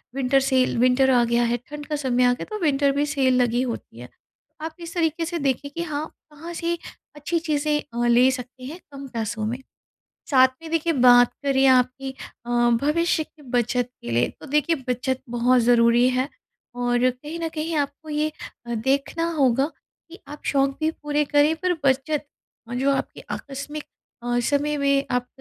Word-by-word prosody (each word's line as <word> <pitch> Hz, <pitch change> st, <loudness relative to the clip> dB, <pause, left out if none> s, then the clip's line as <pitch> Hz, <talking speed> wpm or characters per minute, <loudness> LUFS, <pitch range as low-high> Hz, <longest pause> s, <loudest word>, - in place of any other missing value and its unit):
Winter 270 Hz, 0 st, +2 dB
sale 260 Hz, -2 st, +2 dB
winter 255 Hz, +2 st, +4 dB
आ 245 Hz, -2 st, +4 dB
गया 235 Hz, +1 st, +2 dB
है, 240 Hz, 0 st, +1 dB
ठंड 295 Hz, 0 st, -7 dB
का 300 Hz, -, -3 dB
समय 255 Hz, -4 st, +1 dB
आ 245 Hz, 0 st, +5 dB
गया, 245 Hz, -, -6 dB
तो 430 Hz, -1 st, -6 dB
विंटर 285 Hz, -3 st, +2 dB
भी 290 Hz, +1 st, +2 dB
सेल 265 Hz, -4 st, +2 dB
लगी 240 Hz, 0 st, +1 dB
होती 235 Hz, -, -5 dB
है। 125 Hz, -, -9 dB
तो 310 Hz, -, -15 dB
आप 320 Hz, 0 st, -6 dB
इस 335 Hz, -1 st, -8 dB
तरीक़े 330 Hz, -1 st, 0 dB
से 340 Hz, +1 st, -3 dB
देखिए 280 Hz, 0 st, -1 dB
कि 335 Hz, -, -2 dB
हाँ, 305 Hz, -2 st, -3 dB, 0.3 s
कहाँ 325 Hz, +4 st, -9 dB
से 340 Hz, 0 st, -2 dB, 0.4 s
अच्छी 295 Hz, +3 st, -2 dB
चीज़ें 300 Hz, -2 st, 0 dB
अ, 240 Hz, 0 st, 0 dB
ले 245 Hz, +2 st, +5 dB
सकते 255 Hz, 0 st, -7 dB
हैं, 315 Hz, +7 st, -7 dB
कम 275 Hz, 0 st, -8 dB
पैसों 225 Hz, -3 st, -3 dB
में, 235 Hz, +3 st, -2 dB, 0.7 s
साथ 260 Hz, -2 st, +6 dB
में 325 Hz, -, -8 dB
देखिए 330 Hz, 0 st, +1 dB
बात 245 Hz, -3 st, +6 dB
करें 270 Hz, -1 st, +3 dB
आपकी 260 Hz, +1 st, +2 dB, 0.4 s
अ, -, -, -5 dB, 0.3 s
भविष्य 325 Hz, +2 st, +1 dB
की 305 Hz, 0 st, -22 dB
बचत 245 Hz, -1 st, 0 dB
के 120 Hz, -, -6 dB
लिए, 120 Hz, +1 st, +2 dB
तो -, -, -10 dB
देखिए 300 Hz, +3 st, +1 dB
बचत 255 Hz, +1 st, -1 dB
बहुत 245 Hz, +1 st, +3 dB
ज़रूरी 235 Hz, +1 st, +4 dB
है 255 Hz, +2 st, 0 dB, 0.5 s
और 245 Hz, 0 st, +2 dB
कहीं 295 Hz, +6 st, -8 dB
न 330 Hz, -, -1 dB
कहीं 320 Hz, +1 st, -3 dB
आपको 290 Hz, +2 st, -3 dB
ये 300 Hz, +1 st, 0 dB, 0.4 s
अ, 235 Hz, -, -3 dB
देखना 275 Hz, +8 st, 0 dB
होगा 270 Hz, -2 st, +3 dB, 0.4 s
कि 350 Hz, -, -11 dB
आप 295 Hz, +1 st, -10 dB
शौक़ 275 Hz, -1 st, +2 dB
भी 315 Hz, 0 st, +2 dB
पूरे 295 Hz, -1 st, -1 dB
करें, 290 Hz, +2 st, +3 dB
पर 365 Hz, +2 st, 0 dB
बचत 280 Hz, +3 st, +1 dB, 0.5 s
जो 265 Hz, +3 st, +1 dB
आपकी -, -, -5 dB
आकस्मिक 290 Hz, +2 st, -6 dB, 0.4 s
अ, 240 Hz, 0 st, 0 dB
समय 290 Hz, +4 st, 0 dB
में 280 Hz, 0 st, +2 dB
आक 250 Hz, 0 st, 0 dB
275 Hz, 185 wpm, -23 LUFS, 250-300 Hz, 0.7 s, साथ